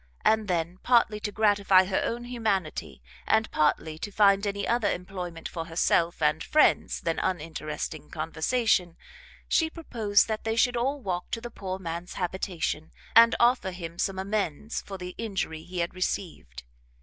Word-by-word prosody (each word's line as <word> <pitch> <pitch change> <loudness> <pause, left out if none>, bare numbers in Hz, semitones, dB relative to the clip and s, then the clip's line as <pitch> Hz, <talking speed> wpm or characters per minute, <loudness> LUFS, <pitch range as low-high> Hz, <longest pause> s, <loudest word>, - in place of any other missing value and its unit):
And 220 -1 +3
then, 175 0 -1
partly 230 -4 +3
to 210 - -3
gratify 200 -3 +4
her 185 0 0
own 240 +1 -2
humanity, 195 - -2 0.2
and 220 0 +2
partly 155 +1 +1
to 205 - -5
find 200 0 +4
any 200 0 -2
other 230 -4 +2
employment 180 -2 -5
for 165 -2 -5
herself 170 0 +1
and 150 - +2
friends 305 - +3
than 165 -1 -1
uninteresting 155 -3 -4
conversation, 170 +3 0 0.5
she 320 -1 +2
proposed 225 -11 +1
that 220 -1 -3
they 225 0 -1
should 245 +2 +3
all 270 +4 0
walk 180 -2 -3
to 230 - -2
the 240 +1 -8
poor 190 -2 -5
man's 170 -1 -6
habitation, 175 -4 -2 0.3
and 230 +1 +8
offer 240 -4 +3
him 170 -2 -7
some 195 -1 -1
amends 200 0 -2
for 195 - -8
the 180 0 -7
injury 190 -8 -3
he 180 +1 -4
had 170 - -2
received. 165 - -4
190 Hz, 160 wpm, -27 LUFS, 170-220 Hz, 0.5 s, and